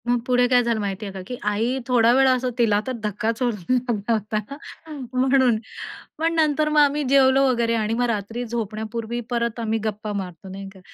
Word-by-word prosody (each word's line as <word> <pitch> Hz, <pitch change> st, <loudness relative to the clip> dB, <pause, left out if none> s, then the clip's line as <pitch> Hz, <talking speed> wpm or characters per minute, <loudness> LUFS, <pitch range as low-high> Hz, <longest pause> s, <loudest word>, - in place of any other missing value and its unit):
मग 245 Hz, 0 st, +2 dB
पुढे 245 Hz, -1 st, +3 dB
काय 250 Hz, 0 st, +4 dB
झालं 235 Hz, -2 st, 0 dB
माहिती 200 Hz, 0 st, -3 dB
आहे 195 Hz, -, -7 dB
का 190 Hz, -, -6 dB
की 250 Hz, -, -5 dB
आई 225 Hz, +5 st, 0 dB
थोडा 235 Hz, -2 st, +4 dB
वेळ 265 Hz, +1 st, +4 dB
असं 255 Hz, -1 st, +2 dB
तिला 215 Hz, -4 st, +3 dB
तर -, -, -1 dB
धक्काच 215 Hz, +3 st, -2 dB
होऊन 240 Hz, -3 st, +1 dB, 0.2 s
लागला 235 Hz, -3 st, 0 dB
होता, 215 Hz, 0 st, -1 dB, 0.7 s
म्हणून. 255 Hz, -2 st, +3 dB, 0.6 s
पण 325 Hz, +2 st, 0 dB
नंतर 310 Hz, -1 st, +2 dB
मग 305 Hz, 0 st, +3 dB
आम्ही 290 Hz, +1 st, +2 dB
जेवलो 270 Hz, 0 st, +5 dB
वगैरे 235 Hz, -2 st, +1 dB
आणि 220 Hz, 0 st, 0 dB
मग 245 Hz, +2 st, +1 dB
रात्री 225 Hz, +2 st, -3 dB
झोपण्यापूर्वी 225 Hz, +1 st, -4 dB
परत 235 Hz, -1 st, -1 dB
आम्ही 225 Hz, -1 st, -1 dB
गप्पा 215 Hz, -1 st, -3 dB
मारतो, 190 Hz, -2 st, -6 dB
नाही 195 Hz, +1 st, -7 dB
का? 190 Hz, -, -16 dB
235 Hz, 190 wpm, -23 LUFS, 215-255 Hz, 0.7 s, जेवलो